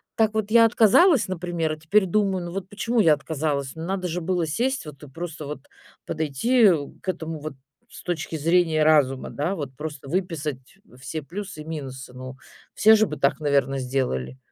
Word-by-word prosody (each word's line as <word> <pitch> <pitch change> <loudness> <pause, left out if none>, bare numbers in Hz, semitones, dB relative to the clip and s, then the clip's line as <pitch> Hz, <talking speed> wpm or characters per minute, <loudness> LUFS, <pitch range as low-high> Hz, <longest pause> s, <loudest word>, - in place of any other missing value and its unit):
Так 220 -1 +2
вот 215 -1 -1
я 230 0 +7
отказалась, 240 - +5
например, 175 -3 -2
а - - -7
теперь 190 +6 +2
думаю, 190 -1 0
ну 175 - -6
вот 190 +1 -5
почему 225 +3 -1
я 165 -6 +6
отказалась? 145 -2 -3
Надо 180 +3 -3
же 175 +1 -3
было 175 -1 0
сесть 250 - -1
вот 150 -3 -11
и - - -9
просто 160 0 -7
вот 145 -2 -6 0.4
подойти 200 - +3 0.3
к 190 - -5
этому 160 -3 -4
вот 155 -1 -6 0.4
с - - -12
точки 165 -2 -3
зрения 165 0 +2
разума, 140 -4 +3
да. 170 +7 -2
Вот 140 -4 -6
просто 150 -1 -7
выписать 160 -5 -3 0.2
все 155 +2 -5
плюсы 190 0 -7
и - - -10
минусы, 135 -5 -7
ну. 130 +1 -9 0.4
Все 220 +1 +7
же 220 0 +3
бы 150 - -6
так, 140 +2 +1
наверно, 140 -2 +1
сделали. 125 - -2
160 Hz, 180 wpm, -24 LUFS, 145-190 Hz, 0.4 s, я